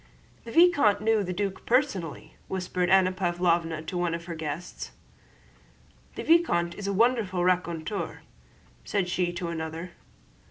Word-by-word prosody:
"The 230 - -7
vicomte 330 - +5
knew 220 -1 +2
the 180 - -3
duc 195 +1 -3
personally," 230 - 0
whispered 180 -1 -1
Anna 190 -1 +5
Pávlovna 175 -3 0
to 175 +2 -4
one 175 -1 0
of 170 0 -7
the 170 - -5
guests. 160 +2 -5 1.3
"The - - -5
vicomte 240 - +3
is 200 +2 -6
a - - 0
wonderful 205 -4 +2
raconteur," 175 +1 -1 0.6
said 200 -3 -1
she 180 0 0
to 175 -1 -4
another. 165 +1 -5
180 Hz, 135 wpm, -27 LUFS, 170-205 Hz, 1.3 s, vicomte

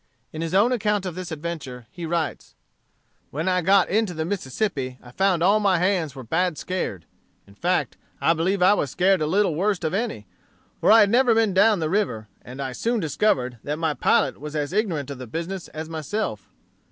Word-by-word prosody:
In 160 - -5
his 165 +2 -2
own 220 +6 +4
account 210 -4 0
of 180 - -3
this 180 0 -7
adventure 145 -6 -6
he 170 -2 -6
writes: 165 -1 -3 0.7
"When 160 +5 -3
I 180 -1 +2
got 190 +2 +4
into 210 -2 0
the 160 0 -2
Mississippi 135 - -3
I 120 - -14
found 185 +2 +1
all 200 +4 +4
my 195 -3 +3
hands 175 -5 0
were 130 - -8
bad 165 +6 0
scared. 175 - -4 0.4
In 100 - -18
fact, 175 - -1 0.2
I 165 - +3
believe 180 +3 0
I 185 - +6
was 145 -9 -1
scared 185 +4 +2
a 155 - +1
little 195 +3 +2
the 155 - -4
worst 200 -2 0
of 160 - -1
any; 200 - -2 0.5
for - - +4
I 225 - +8
had 205 - +4
never 245 -1 +4
been 220 -3 +2
down 200 0 +4
the 160 - 0
river, 120 - -1
and 125 +2 -11
I 135 -1 -3
soon 230 - -1
discovered 130 - 0
that 150 +1 -3
my 160 -1 0
pilot - - +1
was 150 +2 -7
as 150 +2 -2
ignorant 170 - -1
of 135 - -7
the 130 - -7
business 170 +8 -5
as 155 +1 -7
myself. 160 - -4
170 Hz, 210 wpm, -24 LUFS, 150-200 Hz, 0.7 s, I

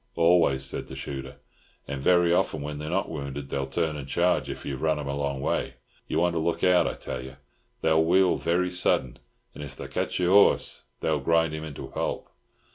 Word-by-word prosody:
"Always," 85 -6 +3
said 70 - -5
the 65 - -8
shooter, 65 -1 -6 0.5
"and 70 -1 -4
very 85 +2 +4
often 80 -4 0
when 75 0 -5
they're 75 0 -5
not 95 +3 0
wounded 70 -2 -6
they'll 70 -1 -1
turn 80 +3 -1
and 70 -2 -6
charge 90 +5 +1
if - - -7
you've 70 -2 -4
run 80 -1 +2
'em 75 -1 -5
a 70 - -2
long 70 -1 -2
way. - - -1 0.3
You - - -1
want 85 +1 +2
to 85 - 0
look 80 +1 -1
out, 90 -1 +5
I - - -3
tell 60 - -5
you. 65 +1 -10 0.5
They'll 80 0 +4
wheel 90 +2 +4
very 90 +2 0
sudden, 85 -8 0 0.3
and - - -8
if 70 -2 -8
they - - -7
ketch - - -2
your 90 +1 +2
horse 100 0 +4 0.2
they'll 80 -2 +1
grind 80 +2 +2
him 80 0 -5
into 75 -3 -7
pulp. - - -4
80 Hz, 210 wpm, -26 LUFS, 70-85 Hz, 0.5 s, out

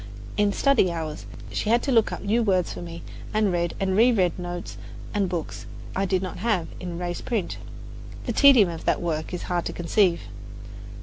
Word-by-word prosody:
In 205 -1 +3
study 250 -5 +3
hours 160 -2 -5 0.2
she 210 - -2
had 235 +2 +3
to 275 - 0
look 225 -3 +4
up - - -5
new 225 +4 +2
words 185 -5 +1
for - - -7
me 170 -1 -8 0.3
and 215 -2 +3
read 170 -1 -1
and 190 -1 0
reread 205 -6 +3
notes 175 0 -6 0.4
and 200 -3 +1
books 170 -3 -5 0.3
I 195 - +1
did 185 0 0
not 185 - -5
have 195 -5 0
in 175 -2 -5
raised 175 0 -4
print. 220 -7 -2 0.7
The - - -1
tedium 260 -9 +7
of 165 -1 -7
that - - +2
work 155 -2 -2
is 180 - -4
hard 175 -1 -1
to - - -3
conceive. 175 +1 +2
185 Hz, 190 wpm, -25 LUFS, 175-210 Hz, 0.7 s, tedium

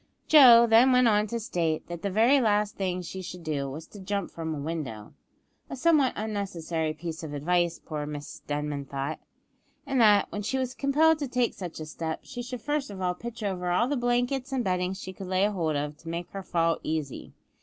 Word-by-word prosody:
Joe 245 -6 +9
then 235 +3 +6
went 250 -1 +5
on 210 -1 +3
to 235 +2 -3
state, 165 -7 -1
that 175 -1 -7
the 200 - -1
very 235 +8 +4
last 210 -2 +1
thing 185 -2 -2
she 190 +2 -6
should 180 -1 -8
do 145 -3 -2
was 155 +4 -7
to 205 - -12
jump 200 0 -3
from 160 -1 -4
a - - -5
window 140 -9 -5 0.6
(a - - -5
somewhat 285 -1 +3
unnecessary 175 -7 -2
piece 160 +1 -6
of 155 -3 -6
advice, 170 +3 +1
poor 150 -2 -5
Miss 145 -1 -7
Denman 145 -1 -3
thought), 140 +3 -4 0.7
and 270 -3 +1
that, 210 -2 +6
when 205 - -3
she 240 +6 -1
was 255 -1 -2
compelled 305 +4 +3
to 285 - -2
take 250 -2 0
such 175 -4 -7
a 155 - -5
step, 160 +1 -5
she 245 -2 -7
should 250 -1 -6
first 290 -2 -1
of 195 - -8
all 180 -1 0
pitch 235 +3 -8
over 180 -3 -2
all 180 +7 +2
the 290 - 0
blankets 245 +2 0
and 260 -2 0
bedding 180 -1 0
she 190 -1 -8
could 190 0 -8
lay 185 +1 +2
hold 170 -7 -1
of 145 +1 -2
to 165 - -10
make 170 +1 -5
her 195 - -5
fall 165 -3 0
easy. 155 -4 -4
190 Hz, 215 wpm, -27 LUFS, 160-240 Hz, 0.7 s, Joe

